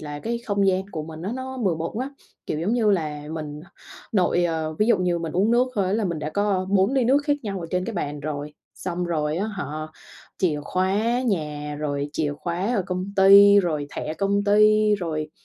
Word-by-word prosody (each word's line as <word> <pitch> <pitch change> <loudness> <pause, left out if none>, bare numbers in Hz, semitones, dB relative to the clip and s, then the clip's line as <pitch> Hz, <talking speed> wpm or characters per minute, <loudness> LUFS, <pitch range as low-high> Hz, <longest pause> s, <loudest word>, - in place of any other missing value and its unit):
là 145 -1 -6
cái 235 +1 -2
không 200 -2 +1
gian 190 0 +2
của 155 - -4
mình 160 +1 -9
á 200 +5 -3
nó 260 0 -6
bừa 190 -8 +1
bộn 160 +1 -3
quá, 270 +3 -4 0.3
kiểu, 155 - -2
giống 200 +7 0
như 220 -3 +3
là, 155 -6 -1
mình 150 -2 -6 0.5
nội, 180 -3 +2
ờ 160 -2 -2
ví 210 - +3
dụ 235 - +4
như 180 -1 +1
mình 165 -2 -4
uống 195 +5 +2
nước 245 +2 +4
thôi 200 - +1
á 185 - -1
là 220 0 +1
mình 170 -3 -2
đã 150 +1 -4
có 200 0 0
4 200 +5 +3
ly 265 -3 +2
nước 275 +4 +3
khác 295 - +2
nhau 195 -4 -4
ở 165 - -5
trên 180 0 0
cái 225 0 -5
bàn 145 -4 -3
rồi, 150 0 -5 0.2
xong 180 -1 -3
rồi 155 -2 -1
á 195 +4 -1
hả, 200 -4 -4 0.7
chìa 155 -6 +1
khóa 210 +7 0
nhà 150 -9 -2
rồi 145 -1 -2
chìa 150 -2 -1
khóa 180 +7 -1
ở 195 - +1
công 185 -1 -2
ty, 200 +1 +8
rồi 155 -5 -2
thẻ 155 - -3
công 200 +3 0
ty, 215 +1 +5
rồi 155 -5 -3
185 Hz, 225 wpm, -24 LUFS, 155-210 Hz, 0.7 s, ty